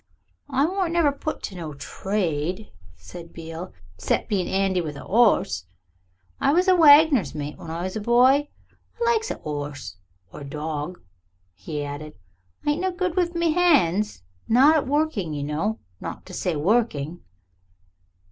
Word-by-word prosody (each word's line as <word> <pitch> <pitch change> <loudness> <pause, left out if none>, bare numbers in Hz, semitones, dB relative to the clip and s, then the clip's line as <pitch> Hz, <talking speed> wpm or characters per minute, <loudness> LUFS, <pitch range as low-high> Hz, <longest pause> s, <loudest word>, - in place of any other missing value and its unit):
"I 275 +1 +2
warn't 365 0 -1
never 335 -4 +3
put 295 +2 -5
to 195 - -5
no 160 -4 -6
trade," 180 +2 -3 0.2
said 130 - -11
Beale, 165 +1 -7 0.3
"'cept - - -1
being 195 -4 0
'andy 190 -1 +1
with 150 -3 -5
a - - -9
'orse. 210 - +2 0.7
I 280 - +3
was 360 +3 +3
a 370 - +6
wagoner's 290 - +6
mate 150 0 -5
when 165 - -9
I 165 +2 -4
was 185 +2 -4
a - - -1
boy. 255 +6 +4 0.5
I 470 - +1
likes 455 -1 +1
a - - -2
'orse. 145 - -6 0.4
Or - - -8
a 140 - -8
dawg," 150 +3 -4 0.5
he 145 - -5
added. 145 +2 -7 0.5
"I 295 - +3
ain't 300 +4 -2
no 375 - +1
good 365 -1 -2
wiv 350 -2 0
me 335 -2 +2
'ands 210 - +2 0.2
not 270 +7 +6
at 300 - +1
working, 275 - 0
you 145 - -3
know 160 +10 -1 0.2
not - - -7
to - - -11
say 175 - -1
working." 175 -3 0
195 Hz, 165 wpm, -24 LUFS, -, 0.7 s, a